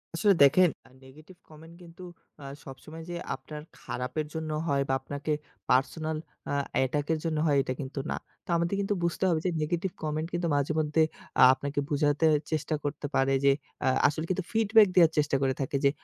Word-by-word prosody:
আসলে 200 +4 +4
দেখেন 175 +6 +6 0.2
আ - - -21
negative 155 +7 -16
comment 160 +2 -14
কিন্তু 170 +1 -13 0.4
আ - - -10 0.2
সবসময় 155 +4 -10
যে, 175 - -4 0.2
আপনার 150 +3 -9 0.2
খারাপের 125 +5 -4
জন্য 160 -1 -4 0.2
হয় 140 -2 +1
বা - - +2
আপনাকে 145 +3 -5 0.4
পার্সোনাল 155 +5 +1 0.3
আ - - -2 0.2
অ্যাটাক 140 +2 +1
এর 160 - -2
জন্য 160 -2 -1
হয় 145 -2 +3
এটা 130 - -3
কিন্তু 135 +1 -6
না। - - 0 0.3
তো - - -23
আমাদের 170 +3 0
কিন্তু 200 +1 0
বুঝতে 170 +1 -1
হবে 165 -2 +2
যে, - - +3
নেগেটিভ 175 +4 -1
কমেন্ট 155 +1 -2
কিন্তু 175 0 -1
মাঝেমধ্যে 155 +2 +1 0.4
আ - - +10
আপনাকে 140 +2 -3
বোঝাতে 150 +1 +2 0.3
চেষ্টা 155 0 -1
করতে 145 0 -4
পারে 135 +1 +2
যে, 140 - +7 0.3
আ - - +2 0.2
আসলে 155 +2 -2
কিন্তু 185 0 -1
ফিডব্যাক 220 -1 +5
দেওয়ার 170 -3 +6
চেষ্টা 150 -2 +2
করে 135 -1 +2
থাকে 140 +1 -1
যে, - - +7
155 Hz, 185 wpm, -28 LUFS, 140-170 Hz, 0.4 s, আ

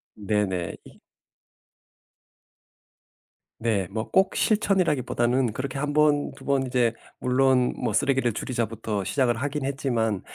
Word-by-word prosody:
네네. 100 -5 -1
이 - - -16 2.6
네. 110 -5 0
뭐 110 +2 -4
꼭 190 0 +3
실천이라기보다는 140 - +1
그렇게 130 +3 -4
1 145 +1 -1
번, 150 -1 +3
2 - - -14
번 140 -1 +2
인제 125 -3 +1 0.3
물론 125 0 +2
뭐 - - -2
쓰레기를 135 -3 +2
줄이자부터 115 -3 -3
시작을 125 +3 +1
하긴 140 +3 -3
했지만 120 -7 -1
125 Hz, 240 characters per minute, -25 LUFS, 110-140 Hz, 2.6 s, 꼭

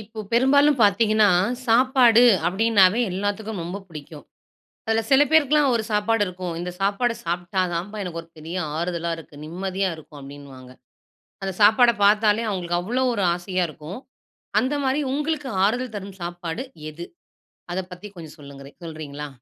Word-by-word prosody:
இப்ப 215 +1 -8
பெரும்பாலும் 280 +3 +4
பாத்தீங்கன்னா, 215 0 +4 0.4
சாப்பாடு 245 0 +5 0.2
அப்டீன்னாவே 200 +2 +3
எல்லாத்துக்கும் 205 +1 -3
ரொம்ப 180 +4 -5
பிடிக்கும். 150 -2 -11 0.6
அதுல 225 0 +2
சில 270 +1 +6
பேருக்குலாம் 300 -2 +4
ஒரு 225 - 0
சாப்பாடு 210 +1 +1
இருக்கும். 180 -1 -5
இந்த 180 +1 -4
சாப்பாட 205 +5 +1
சாப்பிட்டா 175 +3 -2
தாம்பா 195 +6 -4
எனக்கு 170 -2 -5
ஒரு 165 - -21
பெரிய 160 +3 -7 0.2
ஆறுதலா 170 0 -2
இருக்கு, 155 -2 -13
நிம்மதியா 190 +3 -2
இருக்கும். 150 -2 -13
அப்டீன்னுவாங்க. 135 -2 -12 0.7
அந்த 195 - -2
சாப்பாட 220 +4 +6
பாத்தாலே 210 +2 +3
அவங்களுக்கு 175 -4 -2
அவ்வளோவு 250 +7 0
ஒரு 200 -4 0
ஆசையா 180 +1 -2
இருக்கும். 155 +5 -9 0.6
அந்த 260 +3 -1
மாதிரி 265 +2 +1
உங்களுக்கு 295 -1 -2 0.2
ஆறுதல் 240 +2 -1
தரும் 195 -1 -8
சாப்பாடு 175 +4 -5 0.3
எது? 170 +3 -9 0.7
அத 180 - -2
பத்தி 180 +4 -10
கொஞ்சம் 160 -3 -11
சொல்லுங்களே 140 -1 -12
சொல்றீங்களா? 150 -3 -7
195 Hz, 140 wpm, -23 LUFS, 170-230 Hz, 0.7 s, சில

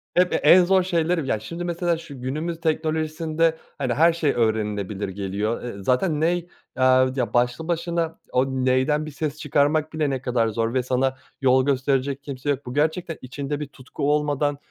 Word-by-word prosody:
hep 180 0 +3
e - - +3
en 180 0 +6
zor 190 +1 +4
şeyleri. 170 -4 0
Ya 110 - 0
şimdi 170 +11 -6
mesela 175 -1 0
şu 140 -5 -10
günümüz 155 +6 -3
teknolojisinde 160 0 0 0.2
hani 130 -4 -1
her 165 +6 +4
şey 160 -4 +1
öğrenilebilir 105 -3 -1
geliyor. 100 +3 -3
Iıı, 100 -5 -6
zaten 150 - +1
ney, 175 +1 +1 0.3
aaa, 130 0 +4
ya 125 -3 -1
başlı 125 +6 +1
başına 170 -1 -1
o 130 +1 +3
neyden 130 +3 +1
bir 155 - -7
ses 145 +1 -3
çıkarmak 150 +2 +1
bile 155 -2 0
ne 135 -2 -2
kadar 125 -3 +1
zor 115 +1 -1
ve 130 -1 +1
sana 130 +1 0 0.2
yol 130 -1 +4
gösterecek 135 0 0
kimse 140 -1 -5
yok. 140 0 -1
Bu 125 - -6
gerçekten 160 +3 0
içinde 140 +3 -4
bir 150 - -4
tutku 140 +1 -3
olmadan, 145 -1 +1
145 Hz, 180 wpm, -23 LUFS, 130-160 Hz, 0.3 s, en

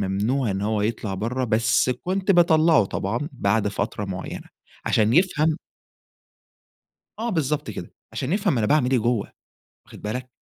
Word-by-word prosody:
ممنوع 105 +6 0
إن 95 +1 -2
هو 105 0 0
يطلع 110 -2 -2
برّه 120 +7 -2
بس 115 +2 +2
كنت 185 +8 -1
باطلّعه 160 - +5
طبعًا 115 +9 -3
بعد 105 -4 +1
فترة 105 +1 -3
معيّنة، 95 -1 -6 0.4
عشان 110 +1 +3
يفهم 160 -2 +3 1.6
آه 235 +1 -2
بالضبط 150 - -1
كده. 90 -4 -8 0.2
عشان 135 +4 -3
يفهم 195 - +1
أنا 110 - +1
باعمل 130 -1 +3
إيه 130 - +3
جوّه 120 -1 -1 0.5
واخد - - -13
بالك؟ 125 +5 -4
120 Hz, 145 wpm, -24 LUFS, 105-155 Hz, 1.6 s, باطلّعه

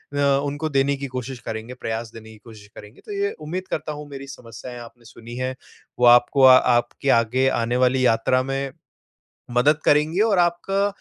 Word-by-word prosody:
अ, - - -1 0.3
उनको 145 +2 -3
देने 140 0 +1
की 140 0 -5
कोशिश 130 0 -6
करेंगे, 110 +3 -5
प्रयास 115 -2 -5
देने 110 -1 -12
की 110 - -14
कोशिश 110 -3 -14
करेंगे। 105 +4 -13
तो - - -9
ये 405 +1 -1 0.2
उम्मीद 185 +4 -5
करता 155 0 -3
हूँ, 150 0 -9
मेरी 140 -1 -9
समस्याएँ 125 -2 -10
आपने 120 0 -14
सुनी 115 +1 -11
है, 130 +1 -3 0.4
वो 125 - +4
आपको 120 +3 +5
आ 130 -1 +9 0.2
आपकी 120 +3 -3
आगे 130 +4 0
आने 120 +2 -1
वाली 130 0 +1
यात्रा 120 +2 +2
में 135 +1 -3 0.9
मदद 150 +5 +3
करेंगी, 150 +5 +2
और 215 -3 +3
आपका 175 +3 +1
130 Hz, 185 wpm, -22 LUFS, 120-145 Hz, 0.9 s, आ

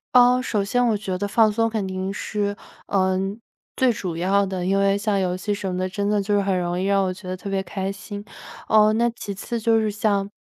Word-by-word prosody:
哦， 250 0 +6
首 215 -5 0
先 245 +5 +1
我 220 - +2
觉 195 -3 -3
得 205 +2 -2
放 220 +1 +4
松 225 +1 +1
肯 220 -3 -2
定 190 0 -3
是， 205 -1 -2 0.3
嗯， 190 +1 0 0.4
最 260 -1 +3
主 185 -6 -4
要 195 +4 +2
的， 185 -2 -3
因 195 +1 +2
为 195 0 +3
像 205 -1 0
游 180 -1 0
戏 205 +3 -2
什 200 -1 -3
么 180 - -3
的， 185 0 -1
真 200 +2 -2
的 210 -1 +2
就 205 +1 -1
是 205 - +3
很 195 -1 0
容 175 0 -1
易 185 - -1
让 195 0 +3
我 185 - -1
觉 185 +1 -12
得 185 - -3
特 185 +2 -7
别 195 -1 0
开 190 +1 -4
心。 205 +1 -8 0.5
哦， 215 0 +5
那 235 +2 +2
其 220 -3 -6
次 230 +4 -4
就 225 +1 +3
是 215 -1 +1
像 200 -1 0
200 Hz, 265 characters per minute, -23 LUFS, 190-215 Hz, 0.5 s, 哦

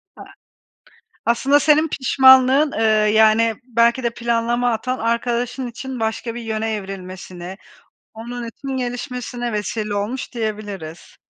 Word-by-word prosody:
A - - -11 1.0
aslında 265 +5 +3
senin 305 +2 +4
pişmanlığın, 265 +1 +5
ııı, 215 -2 +2
yani, 220 +1 +4
belki 235 +1 +2
de 235 - +2
planlama 235 +1 0
hatan 255 +3 -2
arkadaşın 240 +2 -1
için 255 +1 -7
başka 225 +1 -3
bir 240 - -5
yöne 220 -1 -2
evrilmesine, 185 -2 -7 0.6
onun 235 +1 -6
için 270 +3 -6
gelişmesine 245 -1 -4
vesile 210 +1 -3
olmuş, 210 +6 -3
diyebiliriz. 205 -7 -6
235 Hz, 115 wpm, -20 LUFS, 215-250 Hz, 1.0 s, pişmanlığın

